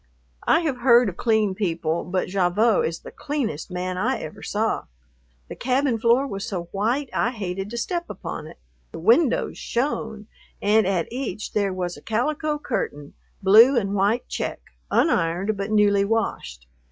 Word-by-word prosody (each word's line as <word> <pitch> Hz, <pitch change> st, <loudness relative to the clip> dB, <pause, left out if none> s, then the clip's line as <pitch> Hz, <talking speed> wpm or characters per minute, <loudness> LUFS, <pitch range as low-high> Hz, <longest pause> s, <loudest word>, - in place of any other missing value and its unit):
I -, -, +5 dB
have 300 Hz, -6 st, -1 dB
heard 240 Hz, -2 st, +5 dB
of 185 Hz, -, -9 dB
clean 220 Hz, -4 st, +2 dB
people, 170 Hz, -4 st, -1 dB
but 185 Hz, +1 st, -1 dB
Gavotte 195 Hz, +4 st, +2 dB
is 165 Hz, +1 st, -5 dB
the -, -, -10 dB
cleanest 280 Hz, -, -3 dB
man 180 Hz, 0 st, -3 dB
I 250 Hz, +7 st, +1 dB
ever 215 Hz, -, -8 dB
saw. 220 Hz, +2 st, -1 dB, 0.6 s
The -, -, -7 dB
cabin 255 Hz, -1 st, 0 dB
floor 235 Hz, +4 st, +3 dB
was 195 Hz, -7 st, -5 dB
so 185 Hz, -4 st, -3 dB
white 240 Hz, +7 st, -1 dB
I -, -, +1 dB
hated 195 Hz, -4 st, -4 dB
to 235 Hz, -, -6 dB
step 345 Hz, +8 st, -2 dB
upon -, -, -6 dB
it. -, -, -13 dB, 0.3 s
The -, -, -8 dB
windows 235 Hz, -, +2 dB
shone, 225 Hz, -4 st, -2 dB, 0.3 s
and 210 Hz, 0 st, +3 dB
at 185 Hz, -4 st, 0 dB
each 235 Hz, -6 st, -4 dB
there 200 Hz, -2 st, +1 dB
was 180 Hz, -1 st, -4 dB
a -, -, -13 dB
calico 295 Hz, +7 st, -1 dB
curtain, 145 Hz, -, -4 dB, 0.3 s
blue 225 Hz, +7 st, +7 dB
and 200 Hz, -3 st, 0 dB
white 205 Hz, +5 st, +1 dB
check, -, -, -3 dB, 0.3 s
unironed 185 Hz, -, +1 dB
but 200 Hz, +1 st, -4 dB
newly 205 Hz, -2 st, +4 dB
washed. 200 Hz, -, -2 dB
215 Hz, 165 wpm, -23 LUFS, 185-245 Hz, 0.6 s, blue